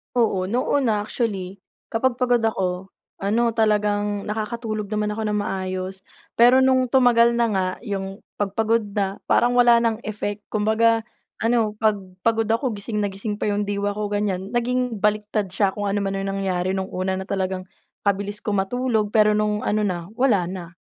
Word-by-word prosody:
Oo, 210 -6 +2
noon, 245 +3 +1
actually 205 -3 -3 0.3
kapag 245 +3 +1
pagod 245 -1 +3
ako, 190 -3 -1 0.3
ano 230 +4 +2
talagang 210 -2 +1
nakakatulog 215 0 -3
naman 210 0 -1
ako 220 +1 -3
ng 210 - 0
maayos. 190 0 -4 0.3
Pero 245 +2 +7
nung 260 -1 +4
tumagal 235 -2 +5
na 235 0 +2
nga 190 -2 +1
yung 195 -3 -5 0.2
pag 200 -1 -2
pagod 225 +1 +2
na, 195 -1 -1
parang 245 +1 +3
wala 240 -1 +7
nang 225 -2 +1
effect. 210 -1 -4
Kumbaga 220 +2 +3 0.4
ano 225 -2 +2
pag 215 -2 +3 0.2
pagod 225 -1 +2
ako 235 +3 +1
gising 210 +1 -2
na 205 - 0
gising 205 +2 -5
pa 210 - +1
yung 205 0 0
diwa 205 0 -1
ko 210 +1 -3
ganyan 205 -1 -2
naging 245 -2 0
baliktad 210 -1 0
siya 195 +1 +1
kung 205 - -3
ano 200 - 0
man 195 -1 -2
ang 195 0 -2
nangyari 185 -1 -1
nung 190 0 -2
una 185 +1 -1
na 190 - -5
talagang 190 -2 -2 0.4
kabilis 200 +1 0
ko 210 - -3
matulog 220 +1 0
pero 215 -1 +4
nung 210 0 0
ano 215 +1 +1
na, 180 -4 -2
wala 225 -7 +2
na. 175 -2 -7
210 Hz, 175 wpm, -23 LUFS, 195-230 Hz, 0.4 s, Pero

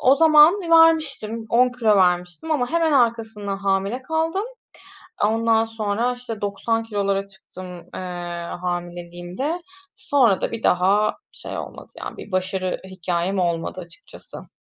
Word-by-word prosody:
o 265 +2 +5
zaman 315 +1 +7 0.2
vermiştim, 310 -9 +3
10 250 +2 +5
kilo 225 -4 +2
vermiştim 180 - +1
ama 260 -6 0
hemen 330 -1 +2
arkasından 220 -6 0
hamile 195 +5 -1
kaldım. 325 +7 -1 0.8
Ondan 225 +1 +2
sonra, 225 +2 -1
işte, 240 -3 -7
90 205 +3 -1
kilolara 200 -3 -1
çıktım, 185 -1 -12 0.3
eee, - - -5 0.6
hamileliğimde. 175 - -4 0.3
Sonra 245 -9 +2
da - - -2
bir 230 - -5
daha 195 +4 +3 0.2
şey - - -7
olmadı. - - -9
Yani, - - -7
bir 210 - -10
başarı 185 0 -1
hikayem 180 +1 -2
olmadı, 170 0 -1
açıkçası. 175 - -13
215 Hz, 125 wpm, -22 LUFS, 185-250 Hz, 0.8 s, zaman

